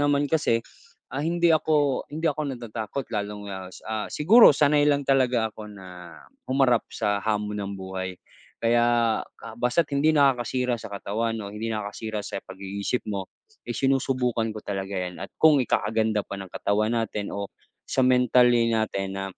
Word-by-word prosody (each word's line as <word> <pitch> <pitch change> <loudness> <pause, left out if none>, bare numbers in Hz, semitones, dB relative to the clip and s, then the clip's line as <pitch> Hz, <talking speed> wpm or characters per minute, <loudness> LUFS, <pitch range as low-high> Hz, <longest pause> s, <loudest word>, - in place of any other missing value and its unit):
naman 145 0 +2
kasi, 140 -7 +1 0.5
ah, 135 - -2
hindi 170 +2 +2
ako 150 -4 +1
hindi 155 +3 -6
ako 150 -3 -1
natatakot 115 +2 -5
lalong, 105 -1 -4
ah, 95 -1 -7
sa 110 +3 -5
siguro 215 +10 +7
sanay 145 0 +4
lang 145 -1 +2
talaga 125 -5 +2
ako 105 0 -9
na 90 -4 -11 0.3
humarap 130 -3 +2
sa 105 -2 -1
hamon 105 -1 -2
ng 100 0 -4
buhay. 95 -1 -5 0.5
Kaya 120 -1 +3 0.2
ka - - -10
basta't 135 +6 +1
hindi 140 +2 +2
nakakasira 125 -3 +2
sa 115 - -8
katawan 110 +3 -2
o 100 - -7
hindi 110 +2 -4
nakakasira 105 0 -4
sa 100 - -5
pag-iisip 100 +5 -4
mo 95 -1 -4 0.4
ay - - -3
sinusubukan 130 -4 +1
ko 105 - -8
talaga 95 0 -4
'yan. 90 -1 -4
At - - -8
kung 155 -3 +5
ikakaganda 110 -3 0
pa 100 - -7
ng 95 - -8
katawan 110 +5 0
natin 105 -2 -2
o 100 0 -5 0.3
sa - - -1
mentally 125 -2 +4
natin 100 -3 -1
na 95 0 -3
115 Hz, 160 wpm, -25 LUFS, 100-135 Hz, 0.5 s, siguro